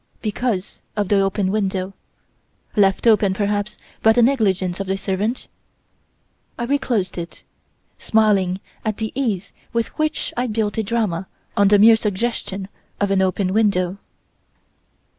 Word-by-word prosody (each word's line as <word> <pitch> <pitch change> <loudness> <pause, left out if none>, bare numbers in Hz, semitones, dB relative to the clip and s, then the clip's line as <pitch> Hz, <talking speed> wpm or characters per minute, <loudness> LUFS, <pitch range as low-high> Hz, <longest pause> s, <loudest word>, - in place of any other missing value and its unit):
Because 215 -3 -2
of 205 -3 -1
the 205 - +4
open 195 0 +1
window 195 -2 -1 0.8
left 195 -1 +3
open, 210 -4 +4
perhaps, 205 0 -1 0.2
by 220 - +6
the 240 +1 +4
negligence 195 -8 +1
of 195 -1 -4
a 195 - 0
servant? 200 +5 -2 1.1
I 235 - -3
reclosed 235 -8 0
it, 170 0 -8 0.6
smiling 200 -4 +2 0.2
at 215 -2 -2
the 220 -1 -3
ease 220 -8 -2 0.2
with 230 -1 0
which 310 0 -1
I 245 +1 0
built 215 -1 -1
a - - +1
drama 200 -5 -1 0.3
on 200 - +4
the 205 +1 +6
mere 225 +3 +8
suggestion 205 -2 -2 0.3
of 205 -1 +1
an 195 -1 +3
open 190 0 0
window. 195 -3 +1
205 Hz, 140 wpm, -21 LUFS, 190-225 Hz, 1.1 s, mere